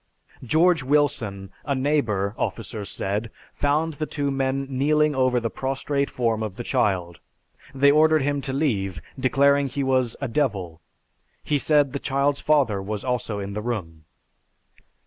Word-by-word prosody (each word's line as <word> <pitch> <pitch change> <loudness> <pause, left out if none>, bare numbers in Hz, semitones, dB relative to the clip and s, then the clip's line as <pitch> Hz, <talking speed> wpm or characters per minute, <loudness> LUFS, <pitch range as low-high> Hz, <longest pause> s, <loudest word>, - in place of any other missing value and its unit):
George 160 +6 +3
Wilson, 120 -9 0
a 140 -1 -1
neighbor, 120 -8 0
officers 110 -4 -4
said, 105 +4 -3 0.2
found 150 +3 0
the 155 +1 -4
two 140 -2 -2
men 135 0 -1
kneeling 150 +3 +2
over 130 -2 +2
the 115 -1 -3
prostrate 140 +1 -2
form 115 -3 -1
of 105 -4 -4
the 120 - -6
child. 90 -6 0 0.6
They 140 +1 +5
ordered 155 0 +4
him 145 0 0
to 135 - -4
leave, 105 - -1 0.2
declaring 140 +2 +3
he 140 +2 -3
was 130 -3 +1
a 140 - -2
'devil.' 100 - -2 0.6
He 145 -1 +1
said 145 -2 +3
the 140 - -2
child's 140 +1 0
father 135 -10 +2
was 105 +1 -4 0.3
in 100 -2 -4
the 105 - -3
room." 85 -9 -5
130 Hz, 145 wpm, -24 LUFS, 105-145 Hz, 0.6 s, They